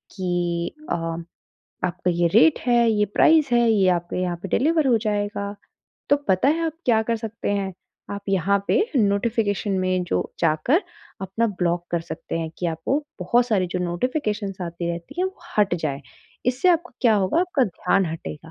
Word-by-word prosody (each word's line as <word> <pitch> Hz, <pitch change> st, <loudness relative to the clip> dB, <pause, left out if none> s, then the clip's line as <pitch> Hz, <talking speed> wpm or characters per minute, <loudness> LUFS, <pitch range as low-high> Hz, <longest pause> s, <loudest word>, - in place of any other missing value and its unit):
कि 175 Hz, -2 st, -1 dB, 0.2 s
अ, -, -, +2 dB, 0.9 s
आपका 180 Hz, 0 st, -1 dB
ये 170 Hz, 0 st, +2 dB
रेट 305 Hz, +7 st, +6 dB
है, 235 Hz, -1 st, +4 dB
ये 210 Hz, -1 st, +2 dB
प्राइस 315 Hz, -4 st, +5 dB
है, 240 Hz, -1 st, +4 dB
ये 195 Hz, -3 st, +3 dB
आपके 175 Hz, 0 st, -1 dB
यहाँ 175 Hz, -1 st, -1 dB
पे -, -, -3 dB
डिलीवर 310 Hz, +1 st, +2 dB
हो 235 Hz, -3 st, +4 dB
जाएगा। 205 Hz, -1 st, -2 dB, 0.6 s
तो 285 Hz, -, +6 dB
पता 190 Hz, +8 st, +3 dB
है 330 Hz, +2 st, +1 dB
आप 320 Hz, -, -2 dB
क्या 225 Hz, -2 st, +4 dB
कर 230 Hz, +1 st, -1 dB
सकते 225 Hz, -1 st, -4 dB
हैं, 195 Hz, -2 st, -1 dB, 0.4 s
आप 200 Hz, 0 st, -5 dB
यहाँ 195 Hz, +1 st, +2 dB
पे 435 Hz, -2 st, +3 dB
नोटिफ़िकेशन 205 Hz, -1 st, +1 dB
में 185 Hz, -1 st, 0 dB
जो -, -, 0 dB, 0.2 s
जाकर 170 Hz, -, +2 dB, 0.4 s
अपना 210 Hz, +5 st, 0 dB
ब्लॉक 175 Hz, -3 st, -1 dB
कर 170 Hz, -, +1 dB
सकते 165 Hz, 0 st, -5 dB
हैं 160 Hz, -1 st, -3 dB
कि 175 Hz, -, -1 dB
आपको 165 Hz, -, -1 dB, 0.2 s
बहुत 235 Hz, +7 st, +2 dB
सारी 195 Hz, -6 st, +1 dB
जो 180 Hz, -, -1 dB
नोटिफ़िकेशंस 205 Hz, -, -2 dB
आती 170 Hz, 0 st, -4 dB
रहती 170 Hz, 0 st, -8 dB
हैं, -, -, +2 dB
वो 375 Hz, -, -8 dB, 0.2 s
हट 195 Hz, -4 st, +4 dB
जाएँ। 140 Hz, -2 st, -2 dB, 0.5 s
इससे 255 Hz, +8 st, +2 dB
आपका 345 Hz, -5 st, +2 dB
क्या 230 Hz, -3 st, +5 dB
होगा, 200 Hz, -, +2 dB
आपका 350 Hz, -7 st, +2 dB
ध्यान 185 Hz, 0 st, 0 dB
हटेगा। 120 Hz, -, -7 dB
200 Hz, 180 wpm, -23 LUFS, 175-235 Hz, 0.9 s, रेट